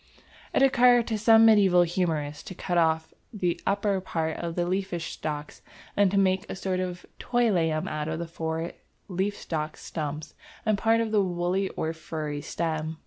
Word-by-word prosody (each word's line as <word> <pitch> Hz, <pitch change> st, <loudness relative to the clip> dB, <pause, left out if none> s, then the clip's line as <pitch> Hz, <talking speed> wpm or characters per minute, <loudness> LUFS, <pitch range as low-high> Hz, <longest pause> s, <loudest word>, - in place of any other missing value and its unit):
It -, -, +3 dB
occurred 245 Hz, -3 st, +5 dB
to 220 Hz, -, 0 dB
some 225 Hz, +1 st, +6 dB
medieval 195 Hz, -5 st, +6 dB
humorist 160 Hz, -4 st, -2 dB
to 185 Hz, -, -7 dB
cut 175 Hz, -, -3 dB
off 160 Hz, -1 st, +1 dB, 0.2 s
the 180 Hz, -5 st, -1 dB
upper 200 Hz, -1 st, +1 dB
part 160 Hz, -3 st, -2 dB
of 170 Hz, -1 st, -4 dB
the 175 Hz, -, 0 dB
leaf 190 Hz, +2 st, -1 dB
stalks, 150 Hz, -2 st, -5 dB, 0.3 s
and 200 Hz, -1 st, +4 dB
to 200 Hz, -, 0 dB
make 190 Hz, -1 st, +2 dB
a -, -, -4 dB
sort 190 Hz, -1 st, -2 dB
of 180 Hz, -1 st, -4 dB
toy 240 Hz, -2 st, +2 dB
lamb 160 Hz, -4 st, +1 dB
out 150 Hz, 0 st, -3 dB
of 160 Hz, 0 st, -2 dB
the 170 Hz, -, -3 dB
four 165 Hz, 0 st, -3 dB, 0.4 s
leaf 195 Hz, +2 st, -2 dB
stalk 155 Hz, -1 st, -4 dB
stumps 150 Hz, -1 st, -5 dB, 0.3 s
and 215 Hz, -1 st, +3 dB
part 225 Hz, +3 st, +2 dB
of 225 Hz, -1 st, -2 dB
the 210 Hz, -2 st, +4 dB
woolly 180 Hz, +1 st, 0 dB
or 160 Hz, +1 st, -3 dB
furry 155 Hz, -2 st, -5 dB
stem. 160 Hz, 0 st, -3 dB
175 Hz, 180 wpm, -27 LUFS, 160-200 Hz, 0.4 s, some